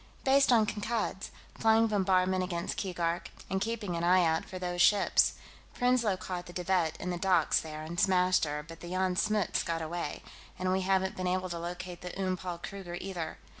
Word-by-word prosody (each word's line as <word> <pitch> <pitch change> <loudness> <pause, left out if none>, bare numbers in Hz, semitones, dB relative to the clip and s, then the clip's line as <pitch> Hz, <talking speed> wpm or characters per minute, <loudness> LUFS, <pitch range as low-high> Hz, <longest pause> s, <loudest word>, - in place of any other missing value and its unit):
"Based 275 0 +4
on 225 -3 +5
Kankad's, 210 -2 -2 0.3
flying 225 0 +5
bombardment 185 -3 +2
against 175 -1 -3
Keegark, 175 -2 -2 0.2
and 190 0 0
keeping 210 -4 -2
an 170 - -2
eye 180 0 +5
out 160 0 +1
for 185 - -7
those 180 -1 -2
ships. 205 +2 +4 0.4
Prinsloo 245 -5 +2
caught 180 -1 -5
the 175 - -10
De 180 - -3
Wett 180 -4 +1
in 180 - -3
the 175 - -3
docks 180 -4 +3
there 155 -1 -7
and 170 +3 -5
smashed 185 -2 +3
her, 150 0 -4
but 165 0 -10
the 175 - -8
Jan 185 0 0
Smuts 210 0 +1
got 165 -1 -2
away, 165 -1 -4 0.3
and 185 0 0
we 190 +1 +1
haven't 190 0 +1
been 185 0 -2
able 185 0 0
to 170 -1 -4
locate 175 +1 -6
the 180 +2 -7
Oom 185 -1 0
Paul 180 -1 -5
Kruger, 175 -1 -7
either. 180 -4 -5
185 Hz, 200 wpm, -30 LUFS, 175-195 Hz, 0.4 s, on